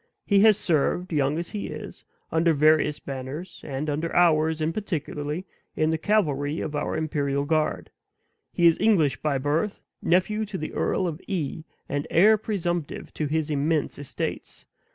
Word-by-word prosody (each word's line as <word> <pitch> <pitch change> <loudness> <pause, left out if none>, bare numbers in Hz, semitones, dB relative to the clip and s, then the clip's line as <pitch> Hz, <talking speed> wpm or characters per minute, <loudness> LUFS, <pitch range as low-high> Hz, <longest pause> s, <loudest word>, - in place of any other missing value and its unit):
He 200 -1 +4
has 215 0 +6
served, 175 0 0
young 145 0 +1
as 170 0 -3
he 210 -2 -4
is, - - -8 0.3
under 165 0 +3
VARIOUS 150 0 +3
banners, 140 +6 -7
and 140 +2 -4
under 155 +3 -2
ours, 160 -2 +4
in 155 +1 0
particular, 155 -4 -3 0.3
in 155 0 +2
the 160 - +1
cavalry 155 -7 +1
of 155 - -4
our 145 - -1
imperial 145 -3 -1
guard. 155 0 0 0.6
He 175 - +1
is 165 -1 +5
English 180 -11 +3
by 150 -3 0
birth, 150 +10 -1 0.2
nephew 210 +5 +2
to 195 -1 -5
the 155 - -5
Earl 185 - 0
of 160 0 -5
E., 160 -4 -3 0.2
and 145 +1 -2
heir 210 +6 +6
presumptive 175 -7 -3
to 155 - -2
his 155 +1 -1
immense 150 +1 0
estates. 145 - -5
155 Hz, 160 wpm, -25 LUFS, 145-175 Hz, 0.6 s, has